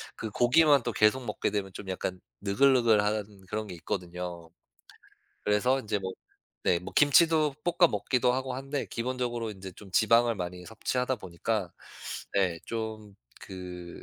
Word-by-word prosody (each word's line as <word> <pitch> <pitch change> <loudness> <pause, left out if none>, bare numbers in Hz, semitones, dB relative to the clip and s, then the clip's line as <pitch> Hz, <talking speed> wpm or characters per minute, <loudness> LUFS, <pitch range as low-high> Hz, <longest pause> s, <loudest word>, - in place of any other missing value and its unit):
그 110 - -5
고기만 140 +3 +5
또 120 - -1
계속 115 +4 +3
먹게 105 - -1
되면 100 -2 -2
좀 95 - -8
약간 95 0 -3 0.2
느글느글한 105 -3 +2
그런 105 0 -3
게 90 - -7
있거든요. 85 -1 -5 1.0
그래서 125 +6 +2
인제 105 -2 -1
뭐 95 -1 -4 0.5
네 85 - +3
뭐 - - -8
김치도 155 0 +5
볶아 175 -1 +4
먹기도 125 +4 +1
하고 130 0 -2
한데 135 +1 -3
기본적으로 120 -2 -2
이제 95 -2 -9
좀 95 +1 -14
지방을 115 +1 +4
많이 90 0 -5
섭취하다 125 +3 -1
보니까 95 0 -3 0.6
네 90 -4 +2
좀 110 -3 -5 0.3
그 90 -2 -8
105 Hz, 295 characters per minute, -29 LUFS, 95-125 Hz, 1.0 s, 고기만